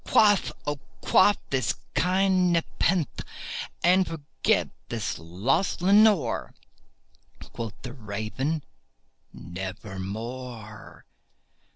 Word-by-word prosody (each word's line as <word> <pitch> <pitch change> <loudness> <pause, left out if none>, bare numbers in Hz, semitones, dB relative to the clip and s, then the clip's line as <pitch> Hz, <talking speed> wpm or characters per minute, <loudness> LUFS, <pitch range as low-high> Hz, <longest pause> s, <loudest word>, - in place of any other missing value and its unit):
Quaff, 205 -3 +4
oh 145 -1 -2 0.2
quaff 205 - +5
this 120 -6 +1 0.2
kind 185 0 +3
nepenthé, 165 - 0 0.6
and 185 +2 +5
forget 155 -3 0 0.2
this 110 -5 -3
lost 95 - 0
Lenore!" 200 0 +4 1.0
Quoth 115 -2 -6
the 125 - -6
Raven, 120 +7 -3 0.7
"Nevermore." 105 +5 -7
130 Hz, 75 wpm, -27 LUFS, -, 1.0 s, quaff